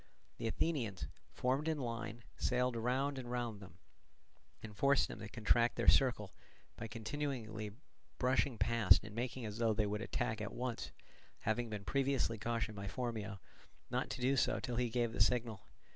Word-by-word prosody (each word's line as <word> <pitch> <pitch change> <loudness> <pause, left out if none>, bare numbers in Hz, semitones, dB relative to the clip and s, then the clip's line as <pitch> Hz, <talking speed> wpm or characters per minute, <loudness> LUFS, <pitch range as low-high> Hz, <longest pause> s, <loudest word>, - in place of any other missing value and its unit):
The - - -1
Athenians, 115 - -1 0.3
formed 135 +5 0
in 160 -1 +1
line, 115 -3 -4
sailed 125 -1 +1
round 130 +4 0
and 120 -2 -6
round 120 -4 -2
them, 90 -3 -12 0.9
and 105 -1 -8
forced 140 +5 +4
them - - -7
to 110 - -7
contract 115 +2 +3
their - - -1
circle, 120 -7 +4 0.4
by 115 - -5
continually 115 -3 -3 0.5
brushing 130 -1 +2
past 115 -1 +5
and 105 0 -8
making 120 0 -3
as 105 +1 -5
though 115 -2 +3
they 110 -1 +2
would 105 +1 -2
attack 110 -1 -1
at 105 - -4
once, 125 -2 -3 0.5
having 115 +2 0
been 105 -2 -5
previously 135 -1 +1
cautioned 115 0 -1
by 100 0 -4
Phormio 110 -3 -3 0.5
not - - 0
to - - -4
do 130 +2 +3
so 125 - +2
till 120 -1 -3
he 125 -1 +1
gave 120 -1 0
the - - -1
signal. 115 0 +1
115 Hz, 170 wpm, -37 LUFS, 110-125 Hz, 0.9 s, past